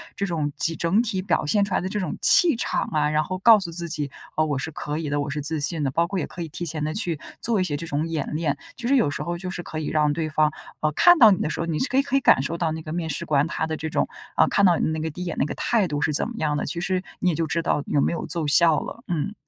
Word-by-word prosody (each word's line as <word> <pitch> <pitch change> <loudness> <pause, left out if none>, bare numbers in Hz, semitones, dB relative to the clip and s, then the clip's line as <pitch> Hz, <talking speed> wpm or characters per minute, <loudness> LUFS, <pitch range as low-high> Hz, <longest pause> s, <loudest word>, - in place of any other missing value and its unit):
这 200 - -2
种 155 -5 -2
集 165 - 0
整 185 +8 +2
体 195 -6 -2
表 185 - 0
现 205 +6 +3
出 195 - -5
来 - - +1
的 185 - -3
这 210 - -2
种 180 -6 -3
气 355 -9 +7
场 235 - -1
啊。 150 -1 +1
然 155 0 +1
后 185 +4 -4
告 220 +1 +7
诉 170 -3 -5
自 170 0 -5
己： 145 -3 -3 0.2
“啊， 155 - +2
我 145 -3 -1
是 160 - -4
可 150 +1 -5
以 155 -2 -3
的， 145 - -1
我 145 - -4
是 150 +1 -3
自 155 +1 -2
信 150 +1 -2
的。” 135 - 0
包 170 +4 +1
括 195 0 -3
也 - - -3
可 175 - -9
以 165 - -4
提 175 +3 -5
前 155 -1 -1
地 155 +1 -2
去 175 -8 -2 0.2
做 225 -4 +1
一 - - +2
些 150 -5 -2
这 165 - -6
种 150 +3 -2
演 155 -2 -3
练， 155 -3 -1 0.2
就 240 - -5
是 275 - +3
有 160 - +3
时 - - -4
候 175 0 -3
就 185 +1 -6
是 180 -1 -5
可 155 - -6
以 155 - -4
让 150 -1 +2
对 160 0 -2
方， 155 0 +2 0.3
呃， 155 0 +1
看 350 - +6
到 220 -5 +9
你 185 - +1
的 - - -1
时 - - -4
候， 165 - -1
你 160 -2 -2
是 260 - 0
可 260 - 0
以 275 - +6
可 275 -1 -3
以 - - +5
感 130 - +4
受 165 +5 -3
到 165 -2 -1
那 160 0 -5
个 155 0 -7
面 165 -2 -3
试 140 - -3
官 145 -1 +2
他 160 - -2
的 160 - -3
这 160 0 -4
种， - - 0 0.3
啊， - - +4
看 200 - +3
到 175 -2 +4
你 - - 0
那 160 0 -2
个 160 +1 -2
第 180 +4 -9
1 - - -3
眼 170 - -4
那 - - +2
个 - - -4
态 215 -6 +1
度 145 -1 -3
是 155 - +1
怎 - - 0
么 235 - -8
样 150 -1 0
的。 - - -2
其 170 - -3
实 185 0 -1 0.2
你 185 - +1
也 160 - 0
就 165 - -1
知 165 +2 -1
道 150 -3 0
有 145 - +1
没 - - +1
有 - - -4
奏 165 -4 -2
效 160 +1 +4
了， - - -8
嗯。 175 +5 -2
165 Hz, 355 characters per minute, -24 LUFS, 150-185 Hz, 0.3 s, 到